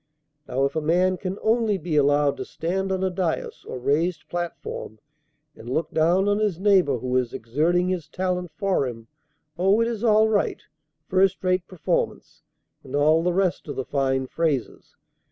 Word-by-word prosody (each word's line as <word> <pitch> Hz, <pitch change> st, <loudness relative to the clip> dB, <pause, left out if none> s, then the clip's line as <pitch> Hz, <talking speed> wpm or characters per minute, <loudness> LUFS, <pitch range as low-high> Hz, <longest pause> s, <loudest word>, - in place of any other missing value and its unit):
Now 135 Hz, +2 st, +1 dB
if 140 Hz, -, -2 dB
a 160 Hz, -, 0 dB
man 180 Hz, +4 st, +2 dB
can 185 Hz, +2 st, -4 dB
only 220 Hz, -2 st, +2 dB
be 165 Hz, -2 st, -3 dB
allowed 145 Hz, 0 st, +3 dB
to -, -, -4 dB
stand 190 Hz, +4 st, -2 dB
on 190 Hz, 0 st, -1 dB
a 190 Hz, -, +1 dB
dais, 180 Hz, -3 st, -3 dB
or -, -, -5 dB
raised 155 Hz, +6 st, 0 dB
platform, 175 Hz, -10 st, -5 dB, 0.6 s
and 115 Hz, -, -10 dB
look 155 Hz, +4 st, -1 dB
down 175 Hz, +5 st, +2 dB
on 205 Hz, 0 st, +2 dB
his 205 Hz, -6 st, 0 dB
neighbor 190 Hz, -9 st, +3 dB
who 125 Hz, +2 st, -3 dB
is 125 Hz, -2 st, -1 dB
exerting 165 Hz, +10 st, +1 dB
his 175 Hz, -4 st, -2 dB
talent 180 Hz, +1 st, -2 dB
for 190 Hz, -9 st, 0 dB
him, 115 Hz, -2 st, -8 dB, 0.5 s
oh, 195 Hz, +4 st, +4 dB
it 230 Hz, -, +2 dB
is 230 Hz, -2 st, -4 dB
all 220 Hz, -1 st, +5 dB
right! 215 Hz, -2 st, 0 dB, 0.4 s
first 190 Hz, 0 st, +2 dB
rate 185 Hz, -1 st, +1 dB
performance! 180 Hz, -5 st, -3 dB, 0.4 s
and 130 Hz, -, -6 dB
all 155 Hz, +3 st, +4 dB
the 180 Hz, +1 st, +1 dB
rest 185 Hz, -2 st, 0 dB
of 145 Hz, -, -5 dB
the 130 Hz, 0 st, -3 dB
fine 135 Hz, -2 st, 0 dB
phrases. 145 Hz, -3 st, -2 dB
175 Hz, 175 wpm, -24 LUFS, 145-190 Hz, 0.6 s, all